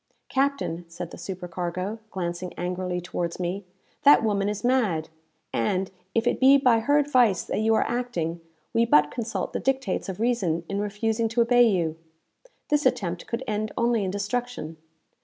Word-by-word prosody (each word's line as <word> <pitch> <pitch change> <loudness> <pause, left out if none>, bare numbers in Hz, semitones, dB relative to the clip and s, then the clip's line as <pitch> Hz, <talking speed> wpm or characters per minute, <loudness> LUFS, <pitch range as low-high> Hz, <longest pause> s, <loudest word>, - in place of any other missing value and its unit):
"Captain," 270 -11 0
said 170 0 -7
the - - -9
supercargo, 185 +2 -4
glancing 175 -1 -4
angrily 180 0 -3
towards 175 -1 -4
me, 180 +3 -2 0.4
"that 285 -4 +7
woman 205 -2 +1
is 210 -1 -4
mad; 220 -11 +1 0.4
and, 185 +12 0 0.2
if 230 +1 +2
it - - +1
be 270 +1 +7
by 250 -4 +4
her 285 +6 +3
advice 250 -10 +3
that - - -2
you 220 +1 +3
are - - +2
acting, 175 -10 -2 0.3
we 230 - +4
but 150 -10 +4
consult 225 -5 -3
the - - -1
dictates 265 -8 -1
of 190 - -5
reason 200 -9 0
in 200 0 -2
refusing 220 +2 0
to 230 +2 -2
obey 245 +1 +5
you. 165 -5 0 0.7
This 295 -2 +3
attempt 180 -8 -2
could 235 +2 -3
end 215 0 -2
only 235 -2 +2
in 190 - -1
destruction. 205 -4 -3
205 Hz, 165 wpm, -26 LUFS, 180-240 Hz, 0.7 s, that